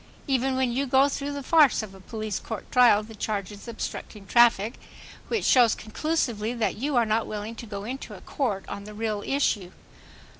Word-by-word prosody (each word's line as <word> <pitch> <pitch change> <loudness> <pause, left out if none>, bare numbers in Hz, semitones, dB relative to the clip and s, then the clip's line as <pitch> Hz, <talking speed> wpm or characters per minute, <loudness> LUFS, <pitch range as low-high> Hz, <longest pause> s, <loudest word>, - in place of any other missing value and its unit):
Even 265 -1 +1
when 260 -2 +1
you 270 +3 -1
go 265 +2 +5
through 285 0 -3
the 285 -1 -5
farce 295 -5 +4
of 205 -3 -9
a 190 - -13
police 215 0 -4
court 220 -4 -7
trial 240 -4 +6
the 225 +1 -11
charge 205 -2 -3
is 205 +3 -11
"obstructing 220 -2 -6
traffic"; 230 0 +4 0.5
which 455 - -1
shows 240 -4 +5
conclusively 235 -2 -2
that 230 -2 0
you 275 +5 -2
are 240 -1 +4
not 220 +1 0
willing 210 +1 -5
to 230 0 -9
go 200 -1 -6
into 255 +5 -6
court 210 -9 -2
on 200 0 -6
the 210 0 -10
real 215 -1 -2
issue. 215 -10 0
230 Hz, 190 wpm, -26 LUFS, 210-265 Hz, 0.5 s, trial